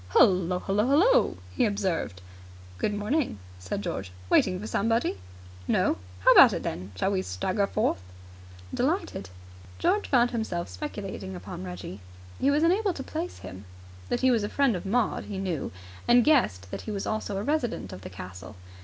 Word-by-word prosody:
"Hullo! 180 Hz, -1 st, +5 dB
Hullo! 200 Hz, +3 st, 0 dB
Hullo!" 365 Hz, -, +4 dB
he 255 Hz, -, +1 dB
observed. 190 Hz, -, -1 dB, 0.6 s
"Good -, -, +1 dB
morning," 235 Hz, -, 0 dB, 0.2 s
said 95 Hz, +2 st, -4 dB
George. 95 Hz, -2 st, -4 dB, 0.2 s
"Waiting 185 Hz, -, +4 dB
for 210 Hz, -, -6 dB
somebody?" 225 Hz, -, 0 dB, 0.5 s
"No." -, -, +2 dB, 0.2 s
"How -, -, +7 dB
about -, -, +9 dB
it, -, -, -3 dB
then? 95 Hz, +3 st, -4 dB
Shall 150 Hz, -, 0 dB
we 190 Hz, -2 st, +1 dB
stagger 190 Hz, -, -1 dB
forth?" 210 Hz, -, 0 dB, 0.7 s
"Delighted." 290 Hz, -, -1 dB, 0.5 s
George 410 Hz, +4 st, +1 dB
found 245 Hz, -2 st, +4 dB
himself 220 Hz, -, -2 dB
speculating 95 Hz, +1 st, -6 dB
upon 90 Hz, +1 st, -7 dB
Reggie. 90 Hz, +1 st, -7 dB, 0.4 s
He 275 Hz, -, +3 dB
was 295 Hz, +2 st, +3 dB
unable 380 Hz, +3 st, +3 dB
to 270 Hz, -, -5 dB
place 330 Hz, +5 st, -5 dB
him. 95 Hz, +2 st, -9 dB, 0.4 s
That -, -, 0 dB
he 260 Hz, 0 st, +5 dB
was 230 Hz, -4 st, +2 dB
a 205 Hz, -, -2 dB
friend 275 Hz, -6 st, +2 dB
of 180 Hz, +2 st, -5 dB
Maud 230 Hz, +2 st, +1 dB
he 200 Hz, -, -5 dB
knew, 185 Hz, -6 st, -2 dB, 0.4 s
and 240 Hz, 0 st, +6 dB
guessed 95 Hz, -, +2 dB
that -, -, -4 dB
he -, -, -8 dB
was 200 Hz, -2 st, -3 dB
also 215 Hz, -2 st, -2 dB
a 200 Hz, -, -2 dB
resident 280 Hz, -4 st, -1 dB
of 90 Hz, -, -9 dB
the -, -, -8 dB
castle. 90 Hz, 0 st, -9 dB
205 Hz, 170 wpm, -27 LUFS, -, 0.7 s, about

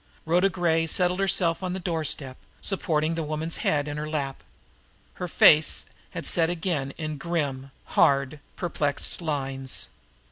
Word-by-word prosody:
Rhoda 175 Hz, +4 st, +3 dB
Gray 165 Hz, -2 st, +1 dB
settled 180 Hz, +3 st, +1 dB
herself 185 Hz, -3 st, +2 dB
on 185 Hz, -1 st, -2 dB
the 190 Hz, -, -3 dB
doorstep, 155 Hz, -6 st, -1 dB, 0.2 s
supporting 160 Hz, -5 st, 0 dB
the 165 Hz, -, -2 dB
woman's 155 Hz, +1 st, -2 dB
head 145 Hz, -1 st, 0 dB
in 145 Hz, 0 st, -4 dB
her 150 Hz, 0 st, -4 dB
lap. 140 Hz, -3 st, -3 dB, 0.8 s
Her 180 Hz, -, -1 dB
face 155 Hz, -2 st, +5 dB, 0.2 s
had -, -, -6 dB
set 165 Hz, -1 st, +3 dB
again 165 Hz, -5 st, -1 dB
in 155 Hz, -2 st, -4 dB
grim, 140 Hz, -5 st, -2 dB, 0.2 s
hard, 140 Hz, +1 st, +2 dB, 0.2 s
perplexed 150 Hz, -2 st, -2 dB
lines. 135 Hz, -4 st, -2 dB
155 Hz, 140 wpm, -26 LUFS, 145-175 Hz, 0.8 s, face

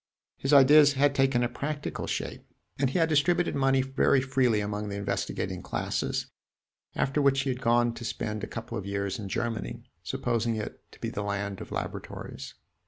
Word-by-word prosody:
His 135 Hz, -, -2 dB
ideas 145 Hz, +1 st, +8 dB
had 140 Hz, +1 st, +3 dB
taken 135 Hz, -3 st, +2 dB
a -, -, +2 dB
practical 145 Hz, +4 st, -4 dB
shape, -, -, -3 dB, 0.4 s
and 135 Hz, -2 st, +2 dB
he 135 Hz, -, -1 dB
had 165 Hz, -2 st, +4 dB
distributed 165 Hz, +3 st, +2 dB
money 135 Hz, -1 st, +3 dB
very 135 Hz, 0 st, +3 dB
freely 130 Hz, -4 st, +2 dB
among 105 Hz, 0 st, -3 dB
the 100 Hz, -, -4 dB
investigating 100 Hz, 0 st, -2 dB
classes, -, -, -2 dB, 0.7 s
after 135 Hz, +2 st, +1 dB
which 135 Hz, -1 st, +4 dB
he 135 Hz, -1 st, 0 dB
had 125 Hz, +1 st, -5 dB
gone 120 Hz, 0 st, +3 dB
to 120 Hz, -, -8 dB
spend 110 Hz, -2 st, -3 dB
a -, -, -2 dB
couple 115 Hz, -1 st, -5 dB
of 95 Hz, -, -7 dB
years 100 Hz, +1 st, -2 dB
in 100 Hz, -2 st, -5 dB
Germany, 115 Hz, -, -3 dB, 0.2 s
supposing 115 Hz, -1 st, -1 dB
it 110 Hz, -, -5 dB
to -, -, -16 dB
be -, -, -3 dB
the 105 Hz, -, -3 dB
land 100 Hz, -1 st, -3 dB
of -, -, -9 dB
laboratories. -, -, -6 dB
125 Hz, 180 wpm, -28 LUFS, 105-140 Hz, 0.7 s, ideas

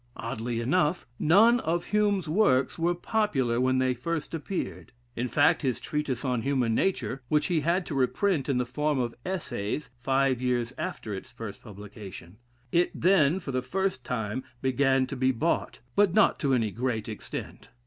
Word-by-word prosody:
Oddly 115 Hz, +1 st, -3 dB
enough, 155 Hz, +6 st, +1 dB
none 220 Hz, +9 st, +5 dB
of 170 Hz, -3 st, -1 dB
Hume's 205 Hz, -3 st, +2 dB
works 155 Hz, -6 st, +2 dB
were 175 Hz, +1 st, +2 dB
popular 155 Hz, -, 0 dB
when 130 Hz, 0 st, +2 dB
they 130 Hz, 0 st, +2 dB
first 155 Hz, +7 st, -4 dB
appeared. 125 Hz, -, -4 dB, 0.2 s
In 120 Hz, +2 st, -1 dB
fact, 145 Hz, +7 st, +3 dB
his 130 Hz, -4 st, -1 dB
"Treatise 145 Hz, -4 st, -3 dB
on 125 Hz, -3 st, 0 dB
Human 125 Hz, -3 st, +1 dB
Nature" 135 Hz, -3 st, 0 dB, 0.2 s
he 170 Hz, +1 st, +1 dB
had 170 Hz, +4 st, +1 dB
to -, -, -5 dB
reprint 140 Hz, +4 st, +1 dB
in 135 Hz, -, +2 dB
the 125 Hz, -, +1 dB
form 150 Hz, +4 st, -1 dB
of 120 Hz, -2 st, -1 dB
Essays, 150 Hz, -, -3 dB
five 135 Hz, 0 st, +1 dB
years 125 Hz, -1 st, 0 dB
after 105 Hz, -, -4 dB
its 95 Hz, +5 st, -7 dB
first 115 Hz, -4 st, -8 dB
publication. 100 Hz, -3 st, -10 dB, 0.3 s
It 175 Hz, +1 st, +3 dB
then, 175 Hz, -2 st, +4 dB
for 150 Hz, -, -6 dB
the 130 Hz, -1 st, 0 dB
first 185 Hz, +1 st, -2 dB
time, 110 Hz, 0 st, -3 dB, 0.2 s
began 130 Hz, 0 st, +2 dB
to 135 Hz, -, -6 dB
be 130 Hz, 0 st, +2 dB
bought; 155 Hz, +7 st, -1 dB
but 200 Hz, -3 st, +3 dB
not 215 Hz, -, +4 dB
to 135 Hz, -3 st, +2 dB
any 110 Hz, -4 st, 0 dB
great 115 Hz, -1 st, -2 dB
extent. 110 Hz, -2 st, -7 dB
130 Hz, 170 wpm, -28 LUFS, 120-170 Hz, 0.3 s, none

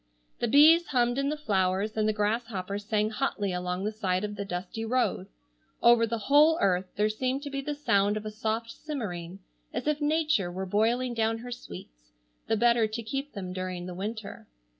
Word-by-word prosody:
The -, -, 0 dB
bees 315 Hz, +7 st, +6 dB
hummed 245 Hz, -1 st, +1 dB
in 275 Hz, 0 st, 0 dB
the 300 Hz, -, -2 dB
flowers, 195 Hz, -4 st, 0 dB
and 215 Hz, 0 st, +1 dB
the -, -, +4 dB
grasshoppers 210 Hz, -2 st, -2 dB
sang 215 Hz, 0 st, +1 dB
hotly 205 Hz, -2 st, -1 dB
along 180 Hz, +1 st, -2 dB
the 210 Hz, -, -1 dB
side 190 Hz, -3 st, -1 dB
of 210 Hz, 0 st, -3 dB
the 200 Hz, -, -4 dB
dusty 195 Hz, +4 st, -5 dB
road. 250 Hz, +3 st, 0 dB, 0.5 s
Over 235 Hz, -1 st, +5 dB
the 230 Hz, +1 st, -2 dB
whole 300 Hz, +3 st, +6 dB
earth 185 Hz, -, +2 dB
there 210 Hz, +1 st, +2 dB
seemed 255 Hz, +5 st, -2 dB
to 285 Hz, -, -6 dB
be 275 Hz, 0 st, -2 dB
the 295 Hz, +1 st, -3 dB
sound 210 Hz, -7 st, +2 dB
of 215 Hz, -, -6 dB
a 215 Hz, -, -4 dB
soft 225 Hz, +1 st, -2 dB
simmering, 195 Hz, -, -6 dB, 0.3 s
as 245 Hz, -, -4 dB
if 300 Hz, 0 st, 0 dB
nature 300 Hz, -, +1 dB
were 190 Hz, +2 st, -4 dB
boiling 230 Hz, +6 st, +1 dB
down 225 Hz, -1 st, 0 dB
her 245 Hz, +2 st, -8 dB
sweets, -, -, -10 dB, 0.3 s
the 225 Hz, -, +1 dB
better 235 Hz, -1 st, +4 dB
to 225 Hz, +2 st, -5 dB
keep 275 Hz, +5 st, -4 dB
them 185 Hz, -2 st, -5 dB
during 185 Hz, -1 st, -4 dB
the 180 Hz, -, -6 dB
winter. 210 Hz, +3 st, -6 dB
220 Hz, 195 wpm, -28 LUFS, 195-245 Hz, 0.5 s, bees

